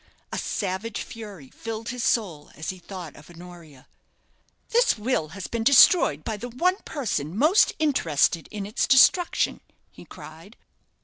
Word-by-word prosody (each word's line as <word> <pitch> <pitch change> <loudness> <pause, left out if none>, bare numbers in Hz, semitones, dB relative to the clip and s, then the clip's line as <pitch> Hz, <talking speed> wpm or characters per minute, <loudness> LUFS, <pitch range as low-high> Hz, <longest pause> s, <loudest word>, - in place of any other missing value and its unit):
A - - -4
savage 200 +3 -4
fury 205 - -11
filled 225 0 -7
his 245 0 -4
soul 175 -11 -1
as 160 - -5
he 185 - -12
thought 180 -4 -9
of 150 +2 -16
Honoria. 170 -5 -14 0.8
"This 480 - +2
will 215 -7 -1
has 200 - -6
been 230 -1 -3
destroyed 250 - +5
by 220 - -4
the 245 +4 -7
one 360 +11 0
person 190 - -3
most 315 - +4
interested 170 - +1
in 205 -2 -6
its 210 +4 -1
destruction," 345 +7 +3 0.3
he - - -15
cried. - - -13
210 Hz, 145 wpm, -24 LUFS, 170-250 Hz, 0.8 s, destroyed